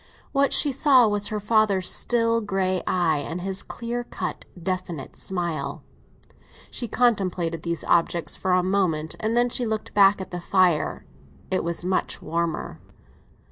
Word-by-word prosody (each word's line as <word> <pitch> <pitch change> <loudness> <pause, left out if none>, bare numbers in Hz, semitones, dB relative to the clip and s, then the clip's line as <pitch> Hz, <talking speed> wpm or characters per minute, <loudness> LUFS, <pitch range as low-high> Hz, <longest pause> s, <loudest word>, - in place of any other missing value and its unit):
What 275 -1 +2
she 290 - +3
saw 260 -3 +5
was 205 -1 0
her 210 0 -3
father's 205 -3 +2
still 230 -1 +2
grey 190 -3 0
eye 165 -4 +2
and 165 +5 -5
his 190 +1 -2
clear 240 +1 -5
cut, - - -5
definite 180 -5 -4
smile. 175 -4 -3 0.9
She 240 - -2
contemplated 185 -9 0
these 170 0 -3
objects 170 -2 +1
for 185 -1 0
a 180 0 +3
moment, 180 -5 0
and 225 +2 0
then 245 0 +3
she 240 0 0
looked 220 -1 -3
back 200 0 +5
at 190 - -7
the 175 -1 -5
fire; 180 -3 +1 0.5
it 185 - +1
was 170 +1 -3
much 185 0 0
warmer. 165 0 -3
190 Hz, 150 wpm, -24 LUFS, 170-220 Hz, 0.9 s, saw